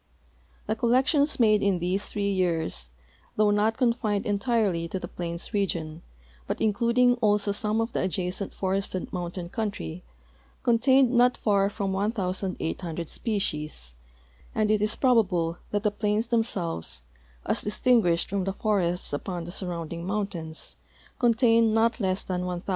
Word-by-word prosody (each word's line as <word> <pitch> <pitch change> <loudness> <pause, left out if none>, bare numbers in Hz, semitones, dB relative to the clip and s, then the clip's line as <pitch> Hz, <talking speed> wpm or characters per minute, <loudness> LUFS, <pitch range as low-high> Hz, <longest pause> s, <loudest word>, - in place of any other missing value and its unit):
The 215 - -1
collections 265 +6 +2
made 215 -3 +4
in 200 -2 +2
these 180 +3 -1
three 200 -1 -2
years, 165 - 0 0.5
though 210 -1 +3
not 215 +2 +2
confined 230 -5 +1
entirely 200 -5 +1
to 180 - -4
the - - -6
plains 170 +3 -5
region, 170 -6 -2 0.5
but - - -2
including 235 +3 +3
also 210 -3 +2
some 210 +2 +1
of 225 +1 -1
the - - 0
adjacent 185 +1 -2
forested 190 -1 -3
mountain 175 0 -4
country, 200 - -4 0.6
contained 255 +2 +4
not 245 0 +4
far 200 -2 +2
from 200 -1 -3
1,800 185 -5 -2
species, 150 - -3 0.6
and 215 -1 +2
it 215 -1 +2
is 210 +1 +1
probable 180 -10 +2
that 205 0 -1
the 210 - +2
plains 210 +2 -1
them 235 -1 +3
selves, 170 - -3 0.4
as - - 0
distinguished 210 -6 +2
from 195 -1 -2
the 195 - -1
forests 185 -6 -1
upon 175 +4 -3
the 175 - -7
surrounding 170 -3 -4
mountains, 190 -6 -3 0.4
contain 230 -2 +4
not 230 +3 +2
less 190 -2 0
than 180 -1 -3
1,000. 180 +1 -5
200 Hz, 140 wpm, -26 LUFS, 180-225 Hz, 0.6 s, made